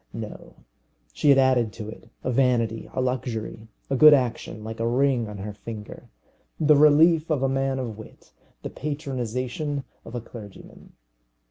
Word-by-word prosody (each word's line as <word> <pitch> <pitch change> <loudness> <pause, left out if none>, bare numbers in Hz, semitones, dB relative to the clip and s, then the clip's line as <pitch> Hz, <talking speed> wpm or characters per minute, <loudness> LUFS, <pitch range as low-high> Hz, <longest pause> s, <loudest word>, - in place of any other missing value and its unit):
No. - - -8 0.6
She 150 - +1
had 140 - +7
added 130 -4 +3
to 105 - -7
it 115 +1 -11
a 130 - -1
vanity, 120 -3 +1
a - - -4
luxury, 120 -3 -3 0.2
a 135 - -1
good 150 +2 +9
action 120 -4 -3
like 110 +1 -7
a 115 - 0
ring 125 -2 +1
on 105 - -8
her 105 +2 -6
finger, 105 0 -9 0.5
the 155 -1 +5
relief 155 +2 +5
of 145 -4 0
a - - +3
man 135 0 0
of 115 -5 -5
wit, 110 - -14 0.3
the - - -5
patronization 135 0 -3 0.2
of 115 - -10
a - - -1
clergyman. 110 -3 -13
125 Hz, 160 wpm, -25 LUFS, 115-140 Hz, 0.6 s, good